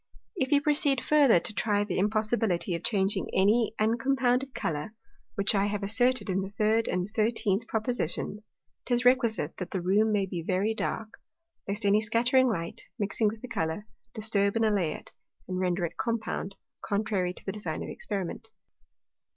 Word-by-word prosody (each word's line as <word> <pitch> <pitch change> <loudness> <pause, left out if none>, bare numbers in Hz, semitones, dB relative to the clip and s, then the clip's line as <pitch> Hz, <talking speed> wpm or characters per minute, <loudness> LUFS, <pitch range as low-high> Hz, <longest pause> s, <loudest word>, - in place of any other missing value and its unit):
If 265 -7 -1
you 285 -1 +5
proceed 290 -2 +3
further 280 - +5
to 215 - -4
try 205 -1 +1
the 205 -3 -2
impossibility 215 -3 0
of 170 0 -4
changing 195 -3 0
any 215 +3 +3
uncompounded 250 +3 +1
Colour 155 +7 -3 0.4
(which 200 +2 +3
I 200 0 +2
have 205 0 -3
asserted 245 +6 +2
in 190 0 0
the 190 - -5
third 220 +2 +1
and 180 0 -1
thirteenth 220 -1 0
Propositions,) 215 -2 -2 0.4
'tis 245 0 +1
requisite 235 - +2
that 180 - -5
the 190 - -2
Room 200 +5 +2
may 205 -2 +2
be 180 -2 -5
very 190 +6 0
dark, 220 0 -3 0.5
lest 205 +1 -3
any 205 +1 +4
scattering 240 +4 +3
light, 170 -8 -3 0.2
mixing 210 +1 0
with 220 +2 -4
the - - -5
Colour, 160 -1 -2 0.3
disturb 205 -2 +1
and 225 0 +2
allay 195 -8 +1
it, - - -8 0.4
and 185 0 -3
render 180 -1 0
it 170 - -7
compound, 225 -4 -3 0.3
contrary 200 -3 0
to - - -11
the 195 - -2
design 185 -6 -4
of - - -6
the - - -6
Experiment. 195 -5 -4
210 Hz, 170 wpm, -28 LUFS, 190-230 Hz, 0.5 s, you